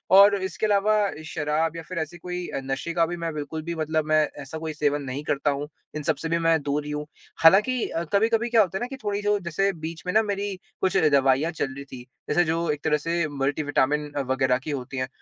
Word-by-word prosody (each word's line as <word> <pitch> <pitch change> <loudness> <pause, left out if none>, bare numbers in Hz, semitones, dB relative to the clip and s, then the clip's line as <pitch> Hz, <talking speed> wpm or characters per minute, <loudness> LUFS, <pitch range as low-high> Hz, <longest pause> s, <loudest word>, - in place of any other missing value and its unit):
और 200 +1 +8
इसके 190 +3 -2
अलावा 210 0 +3 0.3
शराब 155 +1 -1
या 165 - -5
फिर 175 +2 -7
ऐसे 160 +2 -4
कोई 180 +1 -5
अ, - - -3
नशे 135 +5 -3
का 165 -1 +3
भी 175 +1 -4
मैं 165 -1 -3
बिल्कुल 150 +1 -4
भी 170 +1 -4
मतलब 155 -1 0
मैं 155 0 +4 0.2
ऐसा 140 +3 -7
कोई 160 -1 -4
सेवन 145 -1 0
नहीं 135 +2 -5
करता 145 0 0
हूँ। 145 +1 -3 0.3
इन 150 - -3
सब 160 0 +1
से 160 - -4
भी 170 - +2
मैं 165 -2 +3
दूर 145 +1 -1
ही 150 - -5
हूँ। 150 0 -3 0.4
हालाँकि 210 +9 +5
अ, 165 - -2
कभी-कभी 225 +3 +2
क्या 230 -2 +5
होता 190 -1 0
है 215 - -6
ना 245 - -2
कि 270 - -7
थोड़ी 205 -1 -1
जो 205 0 +3
जैसे 195 +2 0
बीच 160 -1 -5
में 180 - +1
ना 220 - +6
मेरी 200 -1 -2 0.3
कुछ 190 0 +2
दवाइयाँ 140 +3 +3
चल 140 -4 -3
रही 140 - -7
थीं। 130 -2 -10 0.3
जैसे 175 - +4
जो 165 +2 0
एक 150 -1 -4
तरह 150 -1 +3
से 165 +2 -1
मल्टी 145 +1 -1
विटामिन 145 +1 +1
अ, 145 - -1
वग़ैरह 130 -1 +1
की 155 - -4
होती 135 -1 -5
हैं 130 0 -1
160 Hz, 250 wpm, -25 LUFS, 145-180 Hz, 0.4 s, और